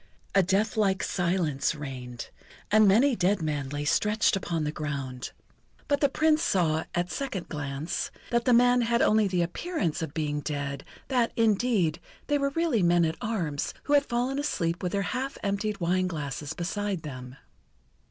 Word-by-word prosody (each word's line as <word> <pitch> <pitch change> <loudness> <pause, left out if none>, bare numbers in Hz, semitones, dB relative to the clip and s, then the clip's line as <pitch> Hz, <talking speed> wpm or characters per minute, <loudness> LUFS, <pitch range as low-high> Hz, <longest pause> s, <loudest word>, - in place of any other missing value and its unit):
A 195 - +6
deathlike 195 +1 +1
silence 170 -6 0
reigned, 125 -5 -7 0.4
and 215 0 +6
many 240 +7 +5
dead 185 +2 +2
men 145 -3 -2
lay 145 +1 -3
stretched 210 +7 +2
upon 170 -4 -2
the 150 - -1
ground. 140 -5 -4 0.6
But 285 0 +1
the 285 - +4
Prince 310 +2 +2
saw, 165 - +1
at 175 0 +1
a - - -4
second 255 -10 -4
glance, 145 +1 -3 0.2
that 235 0 +1
the 250 - +4
men 245 +1 +5
had 235 0 +2
only 215 -1 +4
the 180 -2 +1
appearance 175 - -2
of 160 -3 -5
being 150 -2 -1
dead, 140 -2 -4 0.3
that, 245 -3 +2
indeed, 215 -7 +2 0.3
they 290 -1 +1
were 280 0 +1
really 310 -6 +1
men 175 -1 +4
at 160 0 -1
arms, 170 -10 -2
who 290 - -1
had 285 -1 +4
fallen 250 +3 0
asleep 170 - -1
with 180 -2 -2
their 200 0 +1
half 260 +7 -3
emptied 200 0 -1
wine 185 +1 +1
glasses 150 -2 -4
beside 190 +1 -3
them. 130 -3 -8
185 Hz, 170 wpm, -27 LUFS, 155-235 Hz, 0.6 s, A